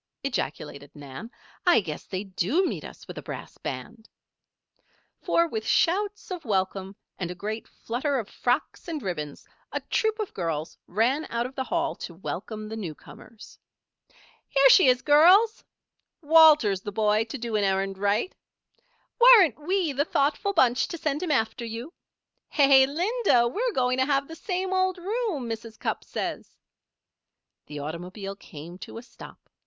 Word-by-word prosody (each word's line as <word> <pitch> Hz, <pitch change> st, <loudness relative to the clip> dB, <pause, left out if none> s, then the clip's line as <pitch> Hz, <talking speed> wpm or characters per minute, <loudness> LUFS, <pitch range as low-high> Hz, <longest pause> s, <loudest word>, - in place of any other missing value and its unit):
ejaculated 150 Hz, -, -4 dB
Nan. 145 Hz, -, -9 dB, 0.3 s
"I 355 Hz, -7 st, +5 dB
guess 160 Hz, -7 st, -6 dB
they 190 Hz, +1 st, -4 dB
do 205 Hz, -, 0 dB
meet -, -, -3 dB
us -, -, -11 dB
with -, -, -7 dB
a -, -, -8 dB
brass -, -, -8 dB
band!" 225 Hz, -1 st, -7 dB, 1.1 s
For, 335 Hz, 0 st, +2 dB
with 220 Hz, -8 st, -4 dB
shouts 405 Hz, +4 st, +1 dB
of 360 Hz, -3 st, -5 dB
welcome, 195 Hz, -3 st, -2 dB, 0.2 s
and 180 Hz, -2 st, -3 dB
a 180 Hz, -, -6 dB
great 215 Hz, +5 st, -5 dB
flutter 270 Hz, +5 st, -2 dB
of 225 Hz, -5 st, -3 dB
frocks 250 Hz, +8 st, -2 dB
and 315 Hz, -4 st, -4 dB
ribbons, 150 Hz, -6 st, -5 dB, 0.3 s
a -, -, -2 dB
troop 440 Hz, -1 st, -1 dB
of 430 Hz, -3 st, -4 dB
girls 165 Hz, -3 st, -3 dB
ran 245 Hz, -, +1 dB
out 235 Hz, +1 st, -1 dB
of 255 Hz, -, -7 dB
the 265 Hz, -1 st, -3 dB
Hall 335 Hz, +1 st, -1 dB
to 170 Hz, -, -8 dB
welcome 215 Hz, +4 st, -6 dB
the 220 Hz, -, -6 dB
newcomers. 210 Hz, +3 st, -10 dB, 0.9 s
"Here 275 Hz, -1 st, +5 dB
she 370 Hz, -, +7 dB
is, 250 Hz, 0 st, +3 dB
girls!" 360 Hz, +10 st, +5 dB, 0.6 s
"Walter's 300 Hz, -, +6 dB
the 205 Hz, -, -6 dB
boy 215 Hz, +1 st, +2 dB
to 230 Hz, +5 st, -6 dB
do 235 Hz, -2 st, -4 dB
an 210 Hz, -, +2 dB
errand 195 Hz, 0 st, 0 dB
right!" 205 Hz, -, 0 dB, 0.9 s
"Weren't 425 Hz, -, +7 dB
we 355 Hz, -1 st, 0 dB
the 280 Hz, +2 st, +1 dB
thoughtful 300 Hz, +7 st, 0 dB
bunch 250 Hz, -7 st, +3 dB
to 340 Hz, -, -6 dB
send 305 Hz, -2 st, -2 dB
him 360 Hz, -, -3 dB
after 235 Hz, -2 st, 0 dB
you?" 235 Hz, +8 st, -6 dB, 0.6 s
"Hey, 275 Hz, -2 st, +6 dB
Linda! 350 Hz, -, +2 dB
we're 470 Hz, -, -1 dB
going 255 Hz, -2 st, +1 dB
to 260 Hz, -, +3 dB
have 275 Hz, -1 st, +1 dB
the 325 Hz, -, -9 dB
same 370 Hz, +2 st, -3 dB
old 375 Hz, 0 st, +1 dB
room, 380 Hz, -, -2 dB
Mrs. 225 Hz, -1 st, -6 dB
Cupp -, -, -3 dB
says." -, -, -5 dB, 1.1 s
The 150 Hz, -, -8 dB
automobile 180 Hz, +7 st, -6 dB
came 170 Hz, -1 st, -11 dB
to -, -, -9 dB
a 230 Hz, -, -8 dB
stop. 250 Hz, -, -14 dB
250 Hz, 160 wpm, -26 LUFS, 200-325 Hz, 1.1 s, she